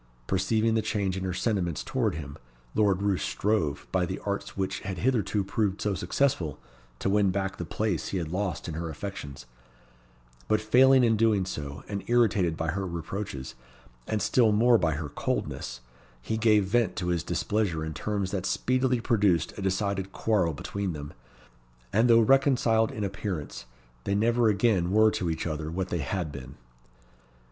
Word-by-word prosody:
Perceiving 110 - +1
the 110 - +2
change 100 -3 -1
in 95 - -4
her 95 - -1
sentiments 90 - -1
towards - - -1
him, 70 -2 -7 0.4
Lord 100 -2 +2
Roos 100 -3 +1
strove, 80 - 0
by 95 -1 +2
the 95 - -3
arts 100 0 -3
which 95 -1 -2
had 95 -1 -5
hitherto 110 -3 +1
proved 100 0 -1
so 105 - 0
successful, 90 - 0 0.4
to - - -3
win 100 0 +3
back 95 0 -2
the 90 - -4
place 105 -1 -2
he 95 - -2
had 80 -3 -3
lost 95 0 -2
in 80 - -4
her 85 +1 -4
affections; 75 -6 -7 1.0
but 110 - +3
failing 130 +4 +5
in 115 -2 +3
doing 105 -4 +3
so, 70 -6 -6
and 100 -1 -4
irritated 105 -8 +2
by 80 - -2
her 95 +2 -3
reproaches, 85 -4 -5 0.5
and 110 -1 -1
still 115 -4 +4
more 115 +2 +5
by 80 -3 +1
her 75 0 -4
coldness, 65 -3 -3 0.4
he 85 - -3
gave 110 -2 +4
vent 105 -2 +1
to 90 -1 -2
his 85 -2 +1
displeasure 85 -1 -1
in 80 - -4
terms 100 +1 -2
that 95 -2 -2
speedily 130 0 +1
produced 100 -8 +1
a - - -7
decided 95 0 -1
quarrel 95 -8 +1
between 100 +5 -3
them; 75 -1 -7 0.8
and 115 +4 +4
though 115 0 +7
reconciled 120 -3 +3
in 105 - -4
appearance, 95 - -4 0.4
they 100 - 0
never 115 +2 +3
again 100 -4 +2
were 110 +2 +5
to 90 -5 -2
each 80 0 -2
other 80 -1 -3
what 90 +2 -3
they 85 - -1
had 80 +3 -2
been. 65 -3 -9
95 Hz, 170 wpm, -27 LUFS, 85-110 Hz, 1.0 s, though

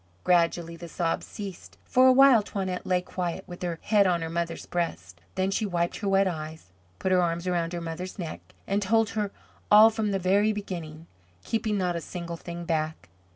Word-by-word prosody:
Gradually 170 -1 +2
the 170 +1 -9
sobs 165 0 -2
ceased. 175 - -8
For 255 +1 +5
a - - +8
while 265 -3 +7
Toinette 190 -3 -4
lay 180 -1 +1
quiet, 180 0 -4
with 175 -1 -10
her 175 -2 -2
head 205 -2 +4
on 170 -2 +1
her 165 - -4
mother's 170 0 -3
breast. 90 - -4
Then 190 +1 0
she 195 - 0
wiped 175 -4 -1
her 200 - -2
wet 195 0 +4
eyes, 155 - -6 0.3
put 190 - -1
her 185 -1 +5
arms 170 0 -1
around 175 -2 0
her 175 - -3
mother's 170 +4 -6
neck, 170 -5 -5 0.2
and 200 +1 0
told 225 +2 +2
her 210 -2 -1 0.4
all 215 +2 +8
from 220 -1 -1
the 195 - 0
very 200 +4 +2
beginning, 165 -6 -6 0.4
keeping 220 -2 -1
not 180 -2 0
a 170 - -3
single 170 0 -6
thing 170 +1 -7
back. 155 - -2
180 Hz, 200 wpm, -27 LUFS, 170-200 Hz, 0.4 s, a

